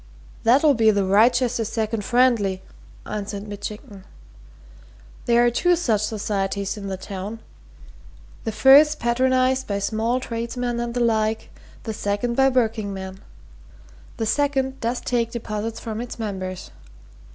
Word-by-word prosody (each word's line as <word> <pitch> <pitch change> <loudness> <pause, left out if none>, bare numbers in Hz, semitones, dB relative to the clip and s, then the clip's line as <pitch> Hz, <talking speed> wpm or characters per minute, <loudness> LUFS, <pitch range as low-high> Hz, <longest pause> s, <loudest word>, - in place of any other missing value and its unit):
"That'll 275 +6 +5
be 225 -3 +4
the 200 -2 +2
Wrychester 235 +4 +3
Second 220 -1 -2
Friendly," 230 -6 +2 0.4
answered 205 0 -5
Mitchington. 205 -1 -8 1.2
"There 240 0 +4
are 240 - +3
two 355 +8 +3
such 235 -12 0
societies 200 -2 -2
in 200 -2 -7
the 190 -1 -4
town 195 +3 -6 1.0
the 225 - -2
first's 275 +7 +6
patronized 255 +2 +1
by 200 - -1
small 220 +5 0
tradesmen 240 0 -3
and 235 0 -3
the 245 - 0
like; 220 -1 0 0.3
the 220 - -4
second 205 +3 -2
by 270 +1 +4
workingmen. 200 -6 -2 1.0
The 225 - -1
second 270 +1 0
does 235 +2 -1
take 235 -2 0
deposits 225 -1 -4
from 220 0 -5
its 245 - -7
members. 190 -4 -5
225 Hz, 130 wpm, -23 LUFS, 205-245 Hz, 1.2 s, first's